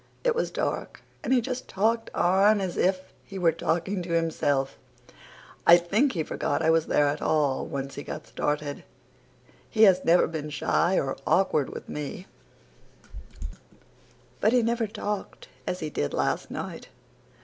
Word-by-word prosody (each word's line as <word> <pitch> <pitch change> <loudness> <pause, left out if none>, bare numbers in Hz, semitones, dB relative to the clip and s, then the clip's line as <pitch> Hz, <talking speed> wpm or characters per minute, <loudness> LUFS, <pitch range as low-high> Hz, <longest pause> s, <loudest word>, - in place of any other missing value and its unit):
It - - +3
was 475 - -1
dark - - -3 0.2
and - - -2
he 255 -2 +4
just 255 +2 -5
talked 225 +4 0
on 195 +4 +4
as 190 -2 -3
if 185 0 0
he 195 - -9
were 175 -3 +3
talking 175 +4 -1
to 170 -1 -4
himself 145 -5 0 0.9
I 170 - +10
think 205 +11 +1
he 165 -4 -1
forgot 160 - -2
I 160 - +4
was 165 -1 +2
there 145 - +3
at 145 +1 -1
all, 145 -4 +1
once 135 0 -5
he - - -6
got 150 - -7
started. 150 -1 -3 0.9
He 220 - +3
has 185 -3 +6
never 170 +2 +5
been 155 -2 -5
shy 170 +5 +1
or 135 -1 -2
awkward 155 -7 +2
with - - -8
me, 150 +5 -6 2.1
but 220 - +3
he 245 -2 +4
never 230 0 0
talked 210 -1 -5 0.2
as 180 - -2
he 155 -1 -4
did 70 - -2
last - - -1
night." - - -6
175 Hz, 160 wpm, -26 LUFS, 150-205 Hz, 2.1 s, I